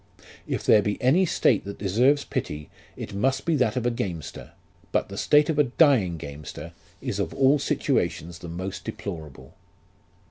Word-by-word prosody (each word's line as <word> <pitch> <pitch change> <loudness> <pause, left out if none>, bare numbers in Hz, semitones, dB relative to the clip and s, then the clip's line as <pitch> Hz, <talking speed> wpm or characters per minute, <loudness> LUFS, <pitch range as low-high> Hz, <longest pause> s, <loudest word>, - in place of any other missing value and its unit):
If - - -2
there 105 - +6
be 105 0 -2
any 165 +9 +3
state 115 -8 +2
that 100 0 -7
deserves 125 +9 +2
pity, 75 0 -4 0.3
it 100 - -7
must 130 +7 0
be 165 - +2
that 125 -3 +1
of 125 -2 -1
a 120 - +2
gamester; 85 -9 -5 0.4
but - - 0
the - - -7
state 150 0 +4
of 155 -2 0
a 150 - +5
dying 120 - +3
gamester 75 +2 -8 0.3
is - - -3
of - - -2
all 135 +2 +4
situations 85 -9 -1
the 85 - -8
most 95 +3 -5
deplorable. 80 - -7
105 Hz, 170 wpm, -25 LUFS, 85-135 Hz, 0.4 s, there